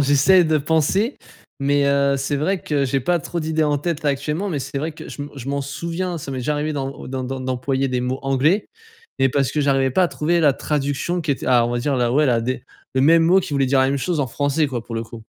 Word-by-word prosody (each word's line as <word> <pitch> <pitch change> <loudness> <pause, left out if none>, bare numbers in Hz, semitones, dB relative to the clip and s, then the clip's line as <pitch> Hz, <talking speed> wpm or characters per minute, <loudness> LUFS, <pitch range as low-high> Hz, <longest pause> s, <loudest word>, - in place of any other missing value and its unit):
j'essaie 145 +7 +5
de 160 -1 +2
penser, 160 - +1 0.4
mais 140 +1 +2
heu, 140 0 +2
c'est 140 +2 -1
vrai 180 +6 -1
que 140 -3 0
j'ai 135 +2 0
pas 175 +7 +1
trop 170 +3 -4
d'idées 160 0 0
en 150 -1 +2
tête 160 +2 -3
là - - +3
actuellement, 150 +8 -1
mais 155 - -2
c'est 140 +1 -4
vrai 155 +2 -3
que - - -10
je - - -8
me 145 - -5
je 135 +1 -7
m'en 140 0 -1
souviens, 170 +5 -4
ça 140 -3 -7
m'est 130 - -4
déjà 140 +4 -1
arrivé 150 +1 -2
d'em 135 -2 -3 0.2
d'em 130 -1 -4
d'em 130 0 -5
d'employer 130 +1 -1
des 125 -1 -1
mots 125 +2 -2
anglais 140 +9 +1 0.5
et 135 - +4
parce 135 0 0
que 150 - 0
j'arrivais 135 -2 +2
pas 185 +8 +3
à 175 - +1
trouver 170 +3 0
la 145 -4 +4
traduction 150 +5 -2
qui 155 - -2
était - - -6
ah 120 -2 +4
on 120 - -3
va 120 - 0
dire 135 +3 0
la, 120 -2 +1
ouais 150 +4 +3
la 120 -4 +2
des 125 +2 -3 0.3
le 130 - +2
même 165 +3 +6
mot 180 +4 +5
qui 175 - -3
voulait 140 -1 +2
dire 135 +1 +3
la 130 - +4
même 140 - 0
chose 170 +2 -1
en 135 - 0
français 145 +4 0
quoi 125 -5 -4
pour 115 - -8
le 115 - -2
coup. 115 -1 -10
140 Hz, 275 wpm, -21 LUFS, 135-155 Hz, 0.5 s, même